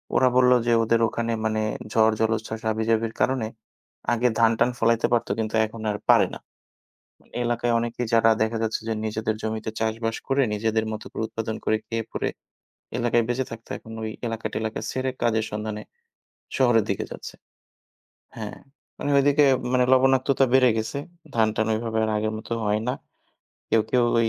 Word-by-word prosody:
ওরা 130 - +5
বলল 125 0 +5 0.2
যে, 120 - +4
ওদের 115 +1 +2
ওখানে 115 +1 -2
মানে 110 0 0 0.3
ঝড়, 110 -1 +4
জলোচ্ছ্বাস, 110 0 -1
হাবি-জাবির 110 +1 0
কারণে 130 -4 +1 0.7
আগে 120 +1 +2
ধান-টান 115 +2 +4
ফলাইতে 115 0 +3
পারত 120 - +2
কিন্তু 110 0 -2
এখন 110 +1 -9
আর 105 - -3
পারে - - +6
না। - - -7 1.1
এলাকায় 120 0 0
অনেকেই 120 +1 -2
যারা 115 0 +5
দেখা 115 +1 0
যাচ্ছে 110 0 -1
যে, - - +1
নিজেদের 110 0 -1
জমিতে 110 0 -3
চাষবাস 115 0 -1
করে, 135 0 +3
নিজেদের 110 +1 0
মতো 110 - -6
করে - - -3
উৎপাদন 110 -1 -4
করে, 110 - +2
খেয়ে-পরে 115 0 -3 0.7
এলাকায় 120 -1 +2
বেঁচে 125 +2 0
থাকত, 115 0 -9
এখন 115 - -12
ওই 110 - -3 0.2
এলাকা-টেলাকা 110 -1 -3
ছেড়ে 130 0 -1
কাজের 110 -1 +2
সন্ধানে 105 0 -4 0.8
শহরের 120 -4 +4
দিকে 100 - -1
যাচ্ছে - - -8 1.0
হ্যাঁ, 110 -2 -6 0.4
মানে 145 - -3
ওইদিকে 145 +1 +5 0.3
মানে 125 -1 +3
লবণাক্ততা 135 +1 +4
বেড়ে 130 -1 +6
গেছে, 110 +6 -3 0.4
ধান-টান 110 -1 +2
ওইভাবে 110 0 -2
আর 110 - -2
আগের 110 +1 -1
মতো 115 - -5
হয় 105 +1 +1
না 125 - +1 0.8
কেউ, 110 -1 +4
কেউ 125 -1 +3 0.2
ওই 115 - +2
115 Hz, 160 wpm, -25 LUFS, 110-120 Hz, 1.1 s, পারে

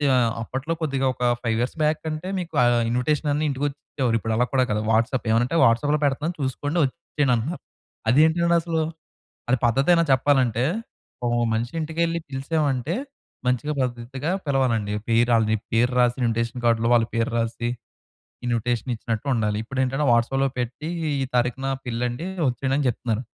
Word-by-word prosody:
ఆహ్, 120 -2 +3
అప్పట్లో 135 +7 -3
కొద్దిగా 135 -3 0
ఒక 125 - -6 0.2
5 115 -2 0
ఇయర్స్ 125 - -2
బ్యాక్ 155 +1 +1
అంటే, 155 +4 -5
మీకు 170 -2 -6
ఆహ్, 120 0 +4
ఇన్విటేషన్ 145 +5 0
అన్నా 150 +2 0
ఇంటికొచ్చిచ్చేవారు. 135 -3 -2
ఇప్పుడు 110 0 -2
అలా 125 - +3
కూడా 130 - +4
కాదు, 105 0 0
వాట్సాప్. 120 +4 +1
ఏవన్నా 115 +2 +3
అంటే, 165 - 0
"వాట్సాప్‌లో 145 +6 +3
పెడతన్నాను, 150 +5 -1
చూసుకోండి, 145 +5 -1
ఒచ్చేయండి" 145 -2 -1
అంటున్నారు. 140 +10 -3 0.5
అది 125 - +5
ఏంటండి 170 +1 +2
అసలు? 165 -1 -1 0.7
అది 130 - +4
పద్ధతేనా 140 +9 +4
చెప్పాలంటే? 130 -3 +3 0.6
ఒక - - +1 0.2
మనిషి 115 +2 -1
ఇంటికెళ్ళి 165 +2 -1
పిలిశామంటే, 140 +1 -1 0.5
మంచిగా 125 +4 0
పద్ధతిగా 130 +4 -3 0.2
పిలవాలండి. 120 -7 +1 0.2
పేరు 115 +1 +3
ఆళ్ళు, 110 -1 +2
నీ 110 - +3 0.2
పేరు 120 +2 +3
రాసి 120 -1 +3
ఇన్విటేషన్ 115 +1 -1
కార్డ్‌లో, 115 -1 +3
వాళ్ళ 115 -2 +4
పేరు 115 0 0
రాసి, 115 +1 -2 0.8
ఇన్విటేషన్ 120 +1 -1
ఇచ్చినట్టుండాలి. 110 -2 -1
ఇప్పుడేంటంటే, 135 +3 -1
వాట్సాప్‌లో 135 +4 +2
పెట్టి, 125 +7 -4 0.3
ఈ - - +1
తారీఖున 125 +2 0 0.2
పెళ్లండి, 120 +6 -2 0.2
ఒచ్చేయండి, 130 +2 -1
అని 145 - 0
జెప్తున్నారు. 115 -1 -2
125 Hz, 150 wpm, -24 LUFS, 115-145 Hz, 0.8 s, అది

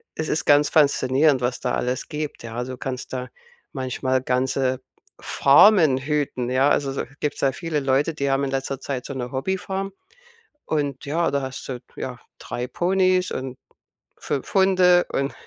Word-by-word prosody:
es 160 - -3
ist 155 - -1
ganz 145 0 +5
faszinierend, 140 -1 +3
was 125 0 -1
da 125 - -2
alles 125 +1 -2
gibt, 150 -1 -5
ja, 115 +1 -4
du 130 0 -7
kannst 130 0 -5
da 125 -1 -4 0.4
manchmal 130 -1 -1
ganze 130 0 0 0.4
Farmen 155 0 +5
hüten, 140 -3 -2
ja? 130 +2 +3
Also, 140 -2 +1
so, 135 - -3 0.2
gibt's 145 -1 -3
ja 135 - +3
viele 160 +2 -3
Leute, 140 +3 +1
die 140 -2 -2
haben 135 +1 +1
in 135 - -2
letzter 135 0 -3
Zeit 135 -3 -4
so - - -5
'ne 125 -2 -5
Hobbyfarm 190 +7 -3 0.8
und, 145 -4 -2
ja, 165 +4 0
da 140 0 0
hast 130 -1 -6
du, 125 -2 -5 0.2
ja, 125 -1 -5 0.2
3 120 - -5
Ponys 185 +3 +1
und 130 0 -5 0.6
5 135 - -4
Hunde 185 -2 +5
und 135 +1 -1
135 Hz, 165 wpm, -23 LUFS, 130-155 Hz, 0.8 s, ganz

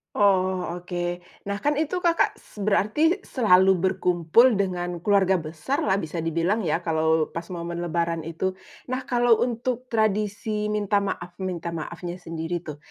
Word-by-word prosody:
Oh, 185 -3 +2
oke. 180 0 -6 0.5
Nah 200 - -1
kan, 290 +8 +1
itu 315 +5 -1
Kakak 340 -2 +2
s 210 - -12
berarti 215 - +2
selalu 190 -6 +4
berkumpul 185 +5 +3
dengan 175 -2 -3
keluarga 190 -3 +3
besarlah 190 - -1
bisa 165 -2 -4
dibilang 170 +7 0
ya 170 -1 -1
kalau 160 -1 +1
pas 165 +2 -6
momen 170 -1 -4
lebaran 170 -1 -1
itu. 165 +4 -3 0.4
Nah 260 - -1
kalau 240 -2 +4
untuk 250 +1 -2
tradisi 210 -1 0
minta 205 -1 +1
maaf 175 -3 -4
minta 170 -2 -3
maafnya 170 +2 -5
sendiri 165 +1 -4
tuh, 150 -4 -8
185 Hz, 145 wpm, -25 LUFS, 170-215 Hz, 0.5 s, selalu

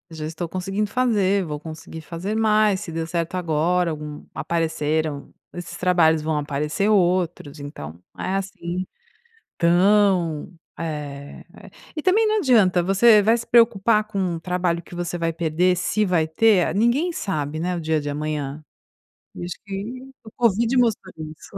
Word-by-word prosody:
Já 155 -1 -5
estou 165 +2 -5
conseguindo 195 +4 -2
fazer, 200 -6 +2
vou 150 -2 -4
conseguir 160 +1 -9
fazer 170 +7 -5
mais, 215 -3 +3
se 185 - -7
deu 165 0 -3
certo 170 +1 -2
agora, 175 +1 +1
algum 150 -1 -7
apareceram 155 -3 -2 0.2
esses 175 -1 -7
trabalhos, 170 -3 +3
vão 155 0 -1
aparecer 150 +6 -1
outros. 175 -6 +1
Então, 140 - -7 0.3
é, 190 - -2
assim, 185 -2 -4 0.7
tão, 175 -2 +3 0.3
eh, 145 -3 -6
eh - - -14 0.2
e 310 - -3
também 415 +6 +3
não 430 0 +2
adianta 215 - +4
você 210 +4 +5
vai 225 +3 +4
se 230 - -6
preocupar 230 -2 +4
com 195 -5 -2
o - - -7
trabalho 175 -1 -1
que 175 - -13
você 175 0 -3
vai 165 -1 -1
perder, 170 +3 +1
se 210 +4 0
vai 170 -4 +2
ter, 180 0 +3
ninguém 240 - +2
sabe, 155 - -3
né, 180 +1 -1
o - - -3
dia 160 -1 0
de 145 - -5
amanhã, 150 0 -4 0.7
e - - -6
acho 175 - -5
que 195 -1 -5 0.4
o 220 - -12
covid 230 +1 +2
mostrou 220 -6 +1
isso. 155 +5 -9
175 Hz, 160 wpm, -23 LUFS, 160-205 Hz, 0.7 s, você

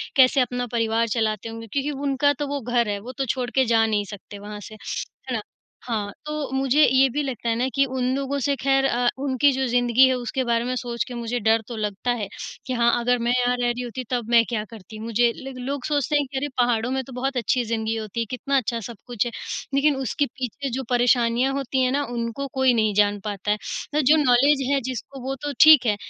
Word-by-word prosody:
कैसे 265 0 +5
अपना 245 0 -2
परिवार 230 0 +1
चलाते 220 -1 -1
होंगे 225 0 -8
क्योंकि 280 +6 -2 0.2
उनका 285 +2 +3
तो 290 - -1
वो 285 -1 -3
घर 240 -1 +1
है 205 -1 -2
वो 245 +5 -8
तो 270 - 0
छोड़ 250 -2 -3
के 265 - +4
जा 225 -1 +3
नहीं 210 -2 0
सकते 205 0 -10
वहाँ 210 +1 -8
से। 215 - -11
है 255 +4 -6
ना? 220 - -2 0.4
हाँ, 210 -4 -2
तो 300 -3 -4
मुझे 270 +3 +3
ये 265 +1 +5
भी 295 +5 -1
लगता 240 -3 -3
है 225 - +1
ना 245 +3 0
कि 275 - +4
उन 260 -1 -3
लोगों 275 +1 -2
से 280 +1 +1
ख़ैर 270 0 +3
अ, 245 -2 +1 0.2
उनकी 280 +1 +3
जो 265 0 -1
ज़िंदगी 245 +1 +4
है 260 - +2
उसके 250 +1 -2
बारे 235 -1 +1
में 255 +1 -1
सोच 235 -3 -2
के 250 - -7
मुझे 235 0 -3
डर 225 +1 +3
तो 240 - -6
लगता 210 +3 -2
है 220 -4 -2 0.4
कि 255 - -3
हाँ, 235 -1 +3
अगर 245 +1 +2
मैं 240 - +2
यहाँ 245 0 +2
रह 245 0 +1
रही 240 +1 -2
होती 250 +2 -5
तब 240 -3 -2
मैं 235 -1 +6
क्या 220 -3 -1
करती। 215 -1 -11
मुझे 230 +1 +2
ल 270 0 -8
लोग 275 -1 -3
सोचते 295 -1 +1
कि 270 0 -6
अरे! 290 +2 -1
पहाड़ों 240 -1 +2
में 265 0 -1
तो 260 - -12
बहुत 265 +1 -2
अच्छी 245 +2 +1
ज़िंदगी 225 0 -1
होती 220 0 -5
है, 230 - 0
कितना 275 +2 -1
अच्छा 235 -1 -1
सब 230 0 -8
कुछ 240 -2 -1
है। 240 - -3 0.4
लेकिन 280 +1 +3
उसके 270 +2 -1
पीछे 265 +1 -5
जो 265 +2 -3
परेशानियाँ 245 +1 +2
होती 270 -1 -1
हैं 255 - +2
ना 285 +2 +1
उनको 235 +3 -3
कोई 265 -2 +3
नहीं 215 -2 +2
जान 205 -1 +3
पाता 205 -1 -2
है। 285 +7 -2
जो 295 +3 +5
नॉलेज 270 +3 +4
है 280 - +3
जिसको 260 +2 -6
वो 270 - -1
तो 290 - -2
ठीक 310 -5 +8
है 210 -2 +2
245 Hz, 235 wpm, -23 LUFS, 230-270 Hz, 0.4 s, ठीक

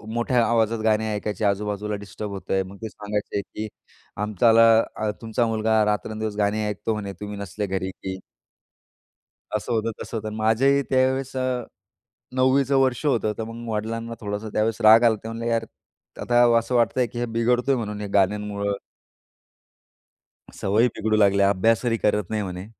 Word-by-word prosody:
अ, - - -16
मोठ्या 120 0 +2
आवाजात 115 -1 +1
गाणी 110 0 +2
ऐकायचे 105 +1 -3
आजूबाजूला 105 +1 -1
डिस्टर्ब 105 +1 -7
होतंय. 95 -1 -1
मग 95 +1 -10
ते 110 - -3
सांगायचे, 105 -1 -3
की 105 +3 -7 0.5
"आमच्याला 110 +3 +4 0.3
अ, 110 0 -1
तुमचा 115 +1 0
मुलगा 110 -1 +2
रात्रंदिवस 110 0 -2
गाणी 105 +1 0
ऐकतो 105 +2 -2
म्हणे 100 -2 -5
तुम्ही 105 0 -6
नसले 100 +1 -4
घरी, 95 0 -2
की." 95 0 -7 1.3
असं 105 +2 -2
होतं, 115 0 0
तसं - - -6
होतं. 110 -1 -4
माझ्याही 125 +6 +3
त्यावेळेस 130 0 +1
अ, 130 -1 -1 0.7
9वीचं 135 +1 +3
वर्ष 130 +2 +1
होतं 115 -6 +1
तर 110 - -2
मग 115 +1 -8
वडिलांना 115 +2 -3
थोडासा 105 +1 -4
त्यावेळेस 110 +1 0
राग 110 +2 +8
आलाता 110 -3 +3
ते - - -5
म्हणले 115 +1 -5
"अरे - - 0
यार! 115 0 +1 0.6
आता 120 0 +3 0.2
असं 115 +2 -3
वाटतंय, 120 +1 +2
की 120 +2 -8
हे 120 - -1
बिघडतोय 125 +3 +2
म्हणून 105 -3 -4
हे 105 - -4
गाण्यांमुळं." 100 +1 +1 1.8
"सवयी 110 +5 +2
बिघडू 110 0 +1
लागल्या 100 -1 +4
अभ्यास 110 +5 +2
ही 115 -1 +2
करत 105 -3 0
नाही." 110 -1 -1
म्हणे. 90 0 -6
110 Hz, 165 wpm, -24 LUFS, 105-115 Hz, 1.8 s, राग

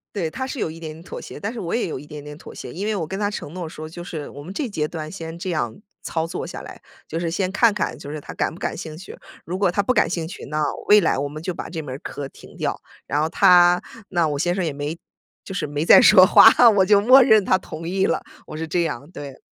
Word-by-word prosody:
对， 170 -5 -1
他 260 +11 -5
是 270 - -6
有 160 - -1
一 165 - -10
点 160 -1 -8
妥 - - -8
协， - - -9
但 205 +3 -4
是 240 - -6
我 170 - -3
也 235 - 0
有 155 - -4
一 145 - -12
点 150 -1 -9
点 150 0 -9
妥 - - -12
协， - - -8
因 195 +4 -5
为 215 -1 0
我 165 -5 -3
跟 190 +4 -5
他 205 -1 0
承 175 -5 -7
诺 175 -3 -5
说， 155 0 -8
就 175 +2 -9
是 160 -4 -6
我 145 - -10
们 175 - -8
这 255 +5 -3
阶 155 -7 -2
段 155 -2 -6
先 165 -2 -7
这 185 +2 -4
样 150 - -3 0.2
操 160 0 -2
作 - - -5
下 - - -7
来， - - -11 0.2
就 165 +1 -4
是 170 - -2
先 185 +2 -1
看 230 +2 +4
看 205 - -2
就 140 - -9
是 150 0 -5
他 - - -10
感 - - -1
不 165 - -12
感 - - -3
兴 160 -3 -7
趣， 185 - -10 0.3
如 180 +2 -4
果 195 -2 +2
他 200 +3 0
不 255 - +1
感 215 - +2
兴 170 -2 -2
趣， 185 - -9
那 155 +2 -2 0.3
未 210 0 +8
来 - - +1
我 140 +1 -2
们 155 +1 -8
就 175 +1 -4
把 - - -6
这 165 - -4
门 130 -3 -6
课 140 -1 -6
停 - - -16
掉。 - - -3 0.3
然 145 +2 0
后 155 - 0
他 180 0 +5 0.3
那 170 -4 +1
我 145 -2 -2
先 175 +4 +1
生 185 - -1
也 160 - -2
没 145 +4 -5 0.5
就 195 - -7
是 170 - -2
没 145 +2 -2
再 - - +8
说 185 -5 +8
话， 225 - +8 0.3
我 190 - +6
就 205 +1 +5
默 255 +6 +7
认 220 -5 +5
他 185 - +3
同 165 -2 -7
意 190 +2 0
了， - - 0 0.3
我 155 - -7
是 160 +1 -4
这 170 +2 0
样， 145 -3 -4
对。 140 -5 -9
170 Hz, 305 characters per minute, -22 LUFS, 155-195 Hz, 0.5 s, 未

